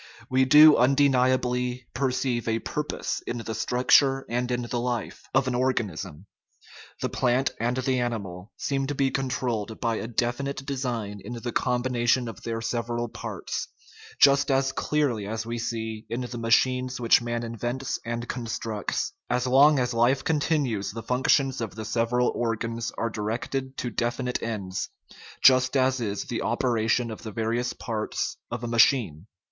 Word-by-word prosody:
We 130 0 +4
do 150 +3 +9
undeni 135 -1 +4
ably 125 -1 -1
perceive 125 -3 -1
a 115 0 +1
purpose 150 +6 -3
in 120 - -2
the 115 -1 -5
structure 130 +4 +3
and 125 +1 -1
in 125 0 -1
the 120 0 -3
life 120 -1 -4
of 130 +1 +2
an 130 - 0
organism. 105 - -2 0.8
The - - -1
plant 130 +2 +1
and 120 +2 0
the 130 0 0
animal 100 -5 -4
seem 135 -1 -1
to 145 - -3
be 135 -1 +1
controlled 120 -5 -2
by 115 -2 0
a 115 - -4
definite 125 +4 -2
design 120 -7 -3
in 120 - -6
the 120 0 -4
combination 125 0 +1
of 115 - -8
their 115 -1 -3
several 120 0 -2
parts, - - -5 0.5
just 140 +1 +5
as 135 0 +2
clearly 135 -11 0
as 110 +1 -3
we 115 0 -4
see 110 -1 -4
in 120 +2 -2
the 125 -1 -5
ma 115 0 -3
chines 130 +1 +2
which 120 0 +5
man 120 0 -3
invents 120 +3 -3
and 120 0 -4
constructs; 115 -3 -3 0.2
as 125 0 +1
long 140 +4 +6
as 125 -1 0
life 125 +4 +2
continues 145 -9 0
the 115 +2 -6
functions 130 +2 +2
of 110 -4 -4
the 110 0 -6
several 120 +2 +1
organs 115 -1 -2
are 115 - -1
directed 120 +5 -3
to 120 - -3
definite 120 +2 -2
ends, 100 -5 -3 0.5
just 130 +1 +6
as 130 -1 +2
is 100 -3 -2
the 120 - -4
operation 120 -1 +1
of 110 - -8
the 110 - -7
various 115 +3 -1
parts 110 -3 -3
of 120 0 -5
a - - -2
machine. 115 - +3
120 Hz, 165 wpm, -26 LUFS, 115-130 Hz, 0.8 s, do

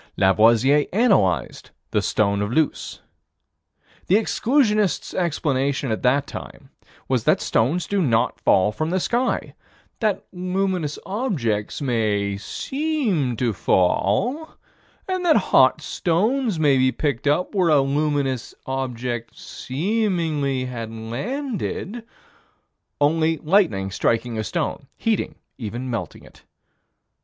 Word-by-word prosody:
Lavoisier 115 +9 +4
analyzed 195 - +1 0.2
the - - +2
stone 100 -1 +1
of 105 +2 -2
Luce. 155 +3 -1 1.1
The 185 - +4
exclusionists' 215 - +1
explanation 140 -6 0
at 110 - -2
that 135 +3 +2
time - - -10 0.4
was - - 0
that - - +4
stones 150 +11 +1
do 200 -1 0
not 120 -6 +1
fall 95 +3 +3
from 155 +8 -3
the 185 +2 +1
sky: 245 +7 -1 0.5
that 215 -4 0
luminous 180 -4 -1
objects 150 - -2
may 105 -5 0
seem 220 - -2
to 120 -2 0
fall, 185 - +1 0.5
and 370 -1 -2
that 335 -3 +4
hot - - +4
stones 210 +4 0
may 145 -4 +4
be 130 0 +3
picked 140 -3 -2
up 150 +8 +1
where 185 -4 +2
a 150 -2 +5
luminous 140 -3 -1
object 125 -3 -4
seemingly 160 - -1
had 115 -3 -6
landed 210 - -4 1.0
only 160 +2 +2
lightning 155 - +1
striking 115 +3 0
a - - -1
stone, 150 -1 -3
heating, 225 -3 -1 0.2
even 120 +3 -5
melting 115 - -5
it. - - -18
145 Hz, 115 wpm, -22 LUFS, 120-195 Hz, 1.1 s, a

